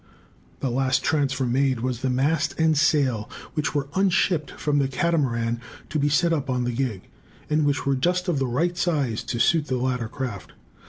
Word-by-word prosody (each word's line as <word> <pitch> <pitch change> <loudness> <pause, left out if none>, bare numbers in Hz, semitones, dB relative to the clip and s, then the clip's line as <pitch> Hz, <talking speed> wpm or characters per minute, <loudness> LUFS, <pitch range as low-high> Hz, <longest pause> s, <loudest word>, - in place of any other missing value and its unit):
The 130 - -1
last 130 +1 +1
transfer 140 -3 +1
made 130 0 +1
was 125 -1 -2
the 135 - 0
mast 140 +8 0
and 160 -1 +4
sail, 140 -7 +2 0.2
which 150 -1 -2
were 145 -1 0
"unshipped" 185 -5 +2
from 145 -1 -1
the 135 - +2
Catamaran 125 -6 0 0.3
to 155 - -1
be 145 +1 +2
set 165 +4 +3
up 145 -4 -2
on 125 -1 0
the 120 - -1
gig, 120 -6 -2 0.5
and 150 0 +3
which 145 0 0
were 140 0 +2
just 180 +7 0
of 165 -6 +1
the 135 - 0
right 165 +9 0
size 145 -10 0
to - - -3
suit 150 +5 +3
the 130 - 0
latter 125 -2 -1
craft. 125 -5 -6
135 Hz, 195 wpm, -24 LUFS, 125-155 Hz, 0.5 s, and